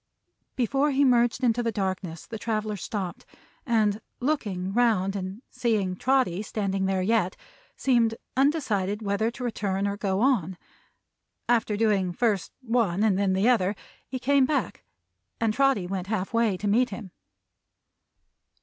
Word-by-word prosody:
Before 270 +4 +1
he 280 0 +3
merged 240 0 +3
into 240 -1 +2
the 230 -1 0
darkness 190 -5 -3
the 225 - -7
traveler 215 -2 -2
stopped, 190 -1 -5 0.4
and 215 -3 +2 0.2
looking 205 -10 -1
round 215 -5 +2
and 195 +4 -5
seeing 210 -6 0
Trotty 255 -5 +1
standing 195 -3 -2
there 190 -1 0
yet, 205 -3 +1 0.4
seemed 235 -4 +2 0.2
undecided 225 - +1
whether 200 +2 0
to 250 +2 -8
return 200 -4 -1
or 200 0 -2
go 195 -1 -1
on. 200 - +1 0.9
After 225 -3 +2
doing 200 -5 +1
first 210 -2 0
the 230 - -11
one 210 -5 +2
and 215 -3 +3
then 195 -1 +1
the 190 +4 +2
other, 210 -5 +3 0.3
he 260 - -4
came 270 +1 +3
back, 295 - -2 0.6
and 225 -2 +1
Trotty 270 -6 +2
went 185 0 -4
half 205 -1 -2
way 230 -4 +2
to 205 - -3
meet 245 +5 +3
him. 200 -2 -8
215 Hz, 150 wpm, -26 LUFS, 195-240 Hz, 0.9 s, he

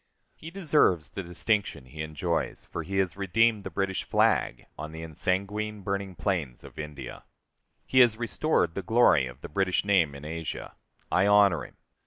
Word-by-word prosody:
He 160 - -10
deserves 150 - +2
the - - -5
distinction 90 -1 -1
he 75 +5 -8
enjoys, 80 +2 -2
for 85 - -5
he 95 +5 -4
has 95 -4 +1
redeemed 105 +2 +2
the - - -5
British 95 -1 -2
flag - - +1
on 75 +1 -7
the 80 0 -7
ensanguined, 100 +6 -2
burning 100 -1 -3
plains 80 - -2
of - - -12
India. 75 -2 -7 0.6
He 130 - +3
has 120 -4 +6
restored 110 -6 0
the 100 - -3
glory 105 - +4
of 65 +2 -12
the - - -7
British 95 +4 0
name 90 -8 +3
in 70 +1 -10
Asia. 80 +1 -6 0.4
I 95 +2 +3
honor 100 -6 +5
him. - - -24
95 Hz, 170 wpm, -27 LUFS, 80-105 Hz, 0.6 s, has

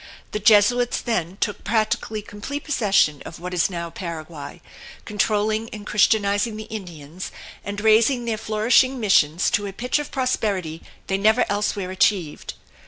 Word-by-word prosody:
The 210 - -2
Jesuits 220 +3 +4
then 190 -6 -2
took 210 - -2
practically 215 0 -1
complete 210 +9 -6
possession 200 - +2
of 165 - -9
what 180 +1 -6
is 175 +1 +2
now 170 -2 -5
Paraguay, 165 -5 -7 0.5
controlling 215 +1 0
and 210 -1 -9
Christianizing 210 +1 +2
the 215 - -6
Indians, 180 -6 -8 0.3
and 200 0 -5
raising 225 +4 +3
their 225 -2 -2
flourishing 230 +4 +2
missions 180 -6 +3
to 205 0 0
a 195 - -7
pitch 250 +7 -1
of 295 - -5
prosperity 200 - -1 0.2
they 195 0 -1
never 220 +4 +4
elsewhere 205 -2 -1
achieved. 185 -4 0
205 Hz, 145 wpm, -23 LUFS, 180-220 Hz, 0.5 s, Jesuits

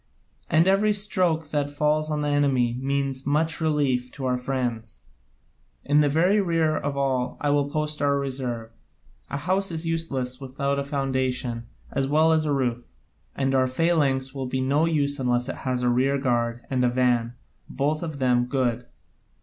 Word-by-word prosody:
And 160 +3 +4
every 205 +2 +3
stroke 180 -6 0
that 145 -1 0
falls 150 +1 0
on 150 -1 -1
the 145 - 0
enemy 135 -5 +2
means 135 -1 -1
so 140 - -3
much 160 +2 +1
relief 140 -5 +1
to 135 -2 -5
our 125 -1 +1
friends. 125 -3 -3 0.8
In 145 +1 +4
the 145 - +3
very 180 +8 +3
rear 165 -4 +1
of 145 -2 -3
all 130 -2 0
I 145 - +1
will 145 0 +1
post 150 0 -2
our 140 -1 +2
reserve. 130 -5 -4 0.6
A - - -3
house 185 +6 0
is 165 -1 -4
useless 140 -6 -2
without 140 +1 -2
a - - -1
foundation 130 -4 -2 0.2
as 135 0 0
well 155 +3 +4
as 160 -1 +2
a 150 - 0
roof, 125 -3 -1 0.5
and 135 -1 0
our 130 -1 +3
phalanx 135 -2 +1
will 135 -2 -4
be 130 +1 -2
no 140 +5 +2
use 145 -3 0
unless 125 -1 0
it - - -4
has 125 -1 0
a 125 - +3
rear 130 +3 +2
guard 120 -3 -1
and 130 -1 +1
a 125 - +4
van, 120 -1 +1 0.3
and - - -12
both 150 +3 0
of 160 -4 -5
them 125 -2 +2
good. 125 -2 -1
140 Hz, 180 wpm, -25 LUFS, 125-150 Hz, 0.8 s, And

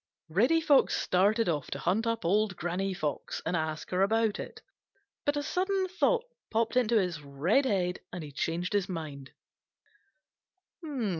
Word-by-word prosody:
Reddy 245 - +3
Fox 290 -3 +4
started 205 +5 +2
off 150 -5 -1
to - - -3
hunt 210 +7 0
up 230 -4 -1
Old 205 +2 +2
Granny 180 +3 -2
Fox 155 -6 -3
and 170 +2 0
ask 155 -1 -3
her 180 +1 +1
about 220 +1 +2
it. - - -7 0.7
But 290 0 +2
a 290 - -1
sudden 375 +4 0
thought 460 +6 +1 0.2
popped 230 +2 0
into 235 -2 +3
his 175 -5 -2
red 150 - +1
head, 185 -6 0
and 180 -2 -5
he 145 - -8
changed 170 +6 -2
his 200 -1 +1
mind. 150 -6 -6
195 Hz, 155 wpm, -30 LUFS, 170-230 Hz, 0.7 s, Fox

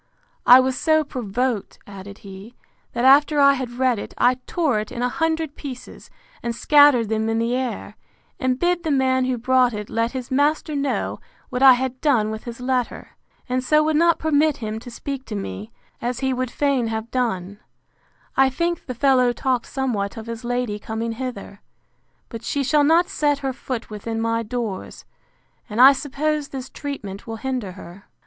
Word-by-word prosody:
I 250 +1 +10
was 260 0 +1
so 315 +3 +2
provoked, 245 -3 -3
added 200 0 -10
he, 195 +5 -11 0.4
that 240 +1 0
after 290 +2 +5
I 280 0 +7
had 255 -3 -4
read 255 -4 +2
it, - - -8
I 250 +1 +3
tore 305 -11 +1
it 210 - -6
in 245 -1 -4
a 250 - +1
hundred 320 0 -1
pieces, 255 -3 -9 0.3
and 235 -1 -3
scattered 285 -3 +5
them 220 +1 -1
in 225 - 0
the 230 +2 0
air, 255 -2 -4 0.4
and 255 -3 0
bid 350 +3 +1
the 325 - -3
man 260 -2 +2
who 255 -1 -1
brought 250 0 +2
it 210 0 -6
let 230 +2 0
his 255 -1 -6
master 295 +3 +1
know 280 -1 -2 0.3
what 250 - -2
I 265 -1 +9
had 255 0 -3
done 235 -8 +2
with 220 0 -7
his 235 -1 -7
letter; 250 -1 -2 0.4
and 255 0 -1
so 305 +3 +3
would 310 0 +1
not 335 +1 +4
permit 310 -1 +2
him 220 -1 -4
to 245 - -10
speak 270 +2 -6
to 215 - -6
me, 100 - -6 0.3
as 245 +1 -3
he 265 -1 +1
would 255 0 -2
fain 270 -2 0
have 225 +1 -4
done,—I 225 +4 -3
think 340 +6 -2
the 255 - -4
fellow 255 -1 +3
talked 250 0 -1
somewhat 230 -8 -2
of 220 - -7
his 230 +1 -7
lady 245 -3 -2
coming 225 +2 -4
hither; 225 -4 -6 0.7
but 230 -2 -8
she 280 +4 -1
shall 295 +2 +3
not 330 +4 +4
set 290 -1 +1
her 265 - -1
foot 250 -3 -6
within 225 +2 -4
my 230 0 0
doors; 230 -4 -5 0.6
and 210 +2 -4
I 265 +2 +9
suppose 290 +2 -2
this 265 -1 -7
treatment 210 -10 -7
will 225 - -4
hinder 240 -5 -4
her. 185 +1 -12
250 Hz, 185 wpm, -22 LUFS, 225-275 Hz, 0.7 s, I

